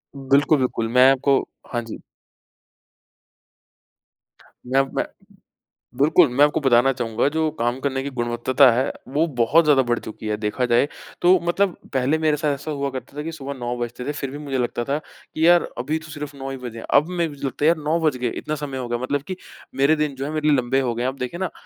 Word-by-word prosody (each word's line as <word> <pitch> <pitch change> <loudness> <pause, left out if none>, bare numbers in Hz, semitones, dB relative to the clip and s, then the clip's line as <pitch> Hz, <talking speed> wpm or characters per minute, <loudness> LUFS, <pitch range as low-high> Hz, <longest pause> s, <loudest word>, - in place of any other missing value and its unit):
बिल्कुल, 140 +3 +3
बिल्कुल। 125 -3 -1
मैं 125 +3 +6
आपको 135 0 +3 0.3
हाँ 120 - 0
जी। 115 - -8 2.7
मैं 130 +2 +2
अप 135 0 0
मैं - - 0 0.9
बिल्कुल। 155 +3 +5
मैं 130 +4 +4
आपको 150 +2 +1
बताना 135 -1 +4
चाहूँगा 120 0 0
कि - - -8
जो 160 -1 +1
काम 120 +2 0
करने 135 -1 -1
की 140 - -4
गुणवत्ता 120 +3 +3
है, 130 +3 0 0.2
वो 150 +5 +1
बहुत 135 +8 +4
ज़्यादा 145 -3 +5
बढ़ 120 -1 0
चुकी 110 0 -9
है। 105 - 0
देखा 105 +4 -2
जाए 120 +4 +3 0.3
तो 180 +1 +6
मतलब 185 +1 +1 0.2
पहले 135 +3 +1
मेरे 155 -1 +2
साथ 150 -1 0
ऐसा 145 +3 -7
हुआ 140 -2 -2
करता 130 +1 -8
था - - -2
कि 165 +2 -5
सुबह 140 -3 -6
9 120 -2 -4
बजते 120 +1 -5
थे, 145 - -2
फिर 140 -2 -5
भी 145 - -7
मुझे 140 -3 -3
लगता 120 -1 -1
था 140 +4 -1 0.4
कि 160 +1 +2
यार 175 0 +6 0.2
अभी 150 +6 -1
तो 155 0 -13
सिर्फ़ 150 -1 -7
9 135 0 -6
ही 135 - -5
बजे 120 -3 -8
हैं। - - -9
अब 150 +3 +5
मैं 175 -2 -1
भी 145 - -11
लगता 135 +2 -2
है - - +6
यार 170 - +4
9 155 +3 +1
बज 155 -5 +1
गए? 125 -1 -1
इतना 155 +6 -4
समय 145 -3 -5
हो 125 -2 -4
गया? 120 0 -1
मतलब 135 +3 -2
कि 185 - -4 0.4
मेरे 140 +4 +3
दिन 150 -2 -1
जो 135 - -4
हैं, 150 - -4
मेरे 155 -1 +1
लंबे 130 +1 +1
हो 125 -3 -1
गए 120 - -3
हैं। 125 - 0
आप 130 - -3
देखें 125 +7 -4
ना, 190 -2 -2
135 Hz, 235 wpm, -22 LUFS, 125-150 Hz, 2.7 s, मैं